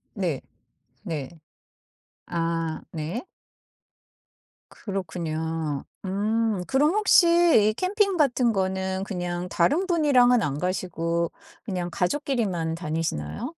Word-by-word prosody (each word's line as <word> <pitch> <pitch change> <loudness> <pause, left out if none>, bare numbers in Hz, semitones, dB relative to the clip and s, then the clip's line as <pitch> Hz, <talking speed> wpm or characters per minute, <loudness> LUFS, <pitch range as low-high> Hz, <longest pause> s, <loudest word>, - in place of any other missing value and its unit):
네. 175 -9 -1 0.6
네. 150 -5 -4 1.0
아 165 -1 -2
네. 165 +8 -4 1.5
그렇군요. 160 -5 -3 0.2
음 210 0 0
그럼 285 +4 +3
혹시 420 -4 +5 0.4
이 215 - 0
캠핑 390 - +1
같은 250 -5 +3
거는 190 0 -1
그냥 180 -2 -3
다른 295 - +2
분이랑은 255 -8 +4
안 145 -6 -1
가시고 170 -2 -1 0.3
그냥 180 -5 -3
가족끼리만 185 - -1
다니시나요? 165 - -3
185 Hz, 195 characters per minute, -25 LUFS, 165-240 Hz, 1.5 s, 혹시